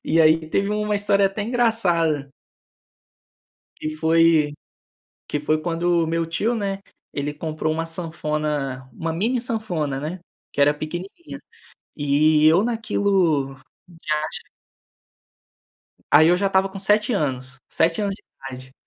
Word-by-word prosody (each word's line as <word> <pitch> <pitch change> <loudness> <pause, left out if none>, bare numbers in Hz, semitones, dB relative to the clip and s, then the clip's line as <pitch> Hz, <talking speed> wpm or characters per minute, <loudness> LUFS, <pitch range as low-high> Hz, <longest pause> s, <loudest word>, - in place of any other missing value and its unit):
e 165 +1 +3
aí, 155 0 +4
teve 200 +4 +1
uma 210 0 0
história 200 -1 +3
até 195 +2 -3
engraçada 180 - +1 1.5
que 155 - -4
foi 160 -1 +3 0.8
que 150 - -2
foi 155 +1 +1
quando 170 0 +1
o - - -3
meu 165 +1 0
tio, 215 +8 0
né, 200 -3 -2 0.3
ele 145 +1 -3
comprou 155 0 -2
uma 165 +1 -2
sanfona, 150 -5 -3
uma 165 +5 -3
mini 230 +9 0
sanfona, 175 - -2
né, 165 +5 -5 0.3
que - - -16
era 145 +1 +6
pequenininha. 175 - -7 0.6
E 150 +1 +3
eu 170 +6 +6
naquilo 195 - +1 0.5
que 155 - -5
acha 150 +1 -2 1.6
Aí, 155 +2 +7
eu 175 - +5
já 195 +1 0
estava 190 0 +2
com 195 - -8
7 210 +4 +2
anos, 135 -6 -2
7 165 +4 +1
anos 200 -1 -1
de - - -17 0.3
idade. 130 0 -10
165 Hz, 135 wpm, -22 LUFS, 150-195 Hz, 1.6 s, Aí